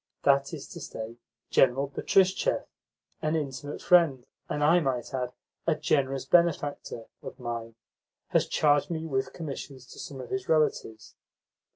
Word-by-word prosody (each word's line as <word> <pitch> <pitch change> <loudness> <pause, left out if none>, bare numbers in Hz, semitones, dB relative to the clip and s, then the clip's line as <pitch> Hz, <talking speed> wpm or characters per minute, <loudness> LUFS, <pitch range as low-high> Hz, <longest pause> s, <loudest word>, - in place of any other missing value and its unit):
That 140 0 +4
is 150 -4 -7
to 170 - -8
say, 115 -3 -7 0.3
General 135 +2 +4
Betristchev, 190 - +2 0.6
an 155 +1 0
intimate 145 -1 -4
friend, 160 -8 +4 0.2
and, 150 - -1
I 165 +4 +6
might 130 -6 -2
add, 125 -1 -2 0.4
a 165 - +4
generous 135 -3 0
benefactor, 145 -7 +1 0.2
of - - -9
mine, 115 -2 -5 0.5
has - - +2
charged 145 +2 +3
me 160 -1 -3
with 130 -4 -1
commissions 140 -5 -7
to - - -11
some 135 - -7
of 125 - -8
his 195 -2 -3
relatives. 150 -8 0
140 Hz, 145 wpm, -28 LUFS, 130-160 Hz, 0.6 s, I